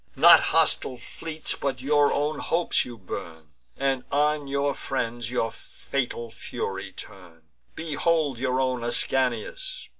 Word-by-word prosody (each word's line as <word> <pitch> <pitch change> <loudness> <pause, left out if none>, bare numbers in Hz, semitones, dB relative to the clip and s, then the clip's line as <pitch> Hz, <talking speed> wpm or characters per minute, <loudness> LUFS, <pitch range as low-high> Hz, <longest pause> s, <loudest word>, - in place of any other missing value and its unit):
Not - - +9
hostile 130 - +3
fleets, 155 +6 -4
but 135 -2 -3
your 145 +2 +3
own 145 +1 0
hopes, 170 +1 +1
you 120 -2 -9
burn, 80 -5 -8 0.3
And 135 -2 0
on 150 0 +1
your 140 +1 0
friends 120 -4 -3
your 120 -2 -1
fatal 120 -3 -4
fury 115 - -5
turn. 85 -4 -11 0.3
Behold 155 -3 0
your 130 0 0
own 130 -2 0
Ascanius!" - - 0
135 Hz, 125 wpm, -26 LUFS, 120-150 Hz, 0.3 s, Not